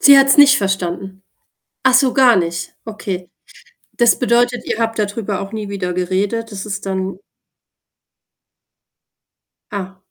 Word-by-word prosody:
Sie 280 -1 +8
hat's 275 0 +5
nicht 280 -2 +7
verstanden? 190 0 -3 0.6
Ach 265 - +4
so, 260 -1 +4
gar 255 -3 +5
nicht? 170 -1 -3
Okay. 195 -5 -6 0.6
Das 240 -1 +3
bedeutet, 245 0 +1
ihr - - -2
habt 225 -1 -1
dadrüber 205 -1 -2
auch 195 +1 -7
nie 215 -2 -5
wieder 185 -3 -3
geredet. 195 +6 -2
Das 200 +1 -6
ist 205 -1 -5
dann 190 -1 -3 2.5
Ah. 190 -2 -6
205 Hz, 130 wpm, -18 LUFS, 190-235 Hz, 2.5 s, Sie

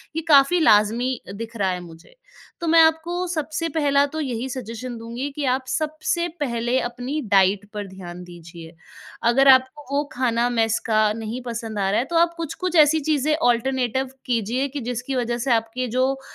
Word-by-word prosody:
ये 325 - -1
काफ़ी 290 +3 +5
लाज़मी 230 0 +3
दिख 230 +2 -7
रहा 195 -3 +1
है 180 - -3
मुझे। 165 - -14 0.5
तो, 335 - -2
मैं 325 0 +6
आपको 320 +3 +2
सबसे 320 0 -3
पहला 285 -2 +2
तो 315 +3 -6
यही 255 -2 -3
सजेशन 245 -1 -6
दूँगी 235 +5 -5
कि 295 - -2
आप 260 0 -3
सबसे 310 +4 -1
पहले 240 -1 0
अपनी 245 +5 -4
डाइट 195 +1 +3
पर 205 -1 -5
ध्यान 180 -2 -9
दीजिए। 170 -1 -12 0.6
अगर 270 +3 +4
आपको 260 +3 +4
वो 290 - +2
खाना 240 -1 +1
मेस 225 -2 +1
का 215 -1 +3
नहीं 225 +3 -5
पसंद 225 -3 -5
आ 195 0 +1
रहा - - +2
है, 250 - -1
तो 340 - -5
आप 340 0 +3
कुछ-कुछ 335 +2 -4
ऐसी 310 0 +5
चीज़ें 300 +1 +1
अल्टरनेटिव 260 0 0 0.2
कीजिए 240 +3 0
कि - - -3
जिसकी 250 +3 -4
वजह 240 -1 -1
से 245 +1 -2
आपके 230 +3 -1
जो 260 +1 +3
अ, 270 - -11
250 Hz, 185 wpm, -22 LUFS, 225-290 Hz, 0.6 s, मैं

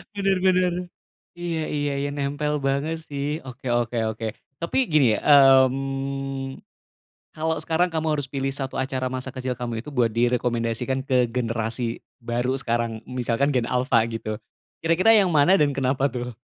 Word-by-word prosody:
Bener 195 -2 +1
bener, 185 -1 +3 0.7
iya 170 -2 -2
iya 145 -1 -1
iya, 140 +1 -1
nempel 145 +1 -2
banget 140 +4 -1
sih, 145 +2 -3
oke 125 0 -10 0.2
oke 120 0 -3 0.2
oke. 110 +1 -5 0.3
Tapi 170 +9 -2
gini 135 -8 +4
ya, - - -3 0.5
mmm, 135 0 -4 0.7
kalo 160 +1 -1
sekarang 165 +3 +1
kamu 160 -1 -2
harus 145 -3 -2
pilih 135 -1 -2
1 135 -2 -3
acara 130 -1 -1
masa 130 0 -5
kecil 130 -1 -3
kamu 120 -2 -4
itu 150 - -9
buat 120 -6 +1
direkomendasikan 120 +1 0
ke 130 -2 +2
generasi 115 -1 -2 0.2
baru 120 +2 -1
sekarang 115 -1 -1
misalkan 125 +2 0
gen 125 -4 +1
alfa 125 -2 +2
gitu, 110 -2 -4 0.5
kira-kira 185 +7 +5
yang 190 -5 +3
mana 155 +6 +5
dan 145 -4 +2
kenapa 135 0 0
tuh? 120 -2 -5
135 Hz, 155 wpm, -24 LUFS, 120-150 Hz, 0.7 s, kira-kira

